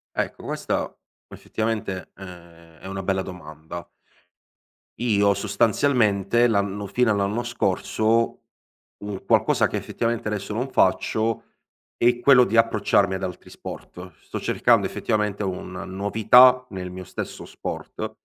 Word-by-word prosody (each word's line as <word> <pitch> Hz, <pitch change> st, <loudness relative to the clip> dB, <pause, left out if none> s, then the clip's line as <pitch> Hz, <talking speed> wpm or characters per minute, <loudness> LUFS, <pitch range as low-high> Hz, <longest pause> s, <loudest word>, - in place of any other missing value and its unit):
Ecco, -, -, -3 dB
questa -, -, -2 dB, 0.3 s
effettivamente 110 Hz, -4 st, -4 dB
è 95 Hz, -, -12 dB, 0.6 s
è -, -, -14 dB
una 95 Hz, 0 st, -5 dB
bella 95 Hz, 0 st, 0 dB
domanda. 85 Hz, -1 st, -9 dB, 1.1 s
Io 100 Hz, -4 st, +3 dB
sostanzialmente 110 Hz, +1 st, +2 dB
l'anno 100 Hz, -2 st, -1 dB
fino 120 Hz, +2 st, +2 dB
all'anno 100 Hz, +3 st, 0 dB
scorso 115 Hz, 0 st, 0 dB, 0.6 s
un 105 Hz, -2 st, -6 dB
qualcosa -, -, +3 dB
che -, -, -3 dB
effettivamente 115 Hz, -1 st, -2 dB
adesso 105 Hz, -1 st, -3 dB
non 125 Hz, +4 st, -2 dB
faccio, 110 Hz, +3 st, +1 dB, 0.5 s
è 120 Hz, 0 st, +2 dB
quello 125 Hz, 0 st, +6 dB
di 110 Hz, +4 st, 0 dB
approcciarmi 105 Hz, -3 st, +3 dB
ad 95 Hz, -, -3 dB
altri 90 Hz, -2 st, -6 dB
sport. 90 Hz, -1 st, -9 dB
Sto -, -, -6 dB
cercando -, -, +2 dB
effettivamente 105 Hz, -1 st, -1 dB
una 90 Hz, -1 st, -5 dB
novità 110 Hz, +7 st, +5 dB
nel 95 Hz, -2 st, -5 dB
mio 95 Hz, +1 st, -8 dB
stesso -, -, -7 dB
sport, -, -, -6 dB
100 Hz, 120 wpm, -24 LUFS, 95-115 Hz, 1.1 s, quello